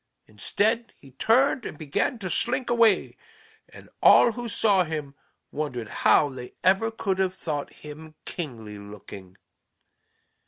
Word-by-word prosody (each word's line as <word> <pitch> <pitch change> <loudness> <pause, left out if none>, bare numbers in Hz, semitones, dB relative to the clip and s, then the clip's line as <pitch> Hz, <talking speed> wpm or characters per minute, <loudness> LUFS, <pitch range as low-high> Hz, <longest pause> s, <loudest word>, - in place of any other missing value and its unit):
Instead 220 - -1
he 135 - -17
turned 245 - +2
and - - -7
began 155 - -1
to 195 -4 -5
slink 245 +6 -1
away, 230 -2 +3 0.5
and - - -14
all 240 - +7
who 240 0 -6
saw 200 -3 +3
him 155 -4 -5 0.4
wondered 130 -7 -4
how 150 - +5
they 130 -3 -9
ever 195 +5 +3
could 195 -4 -2
have 185 -1 0
thought 145 -5 -4
him 155 +1 -12
kingly 115 - -7
looking. 100 -2 -12
160 Hz, 130 wpm, -25 LUFS, 135-225 Hz, 0.5 s, all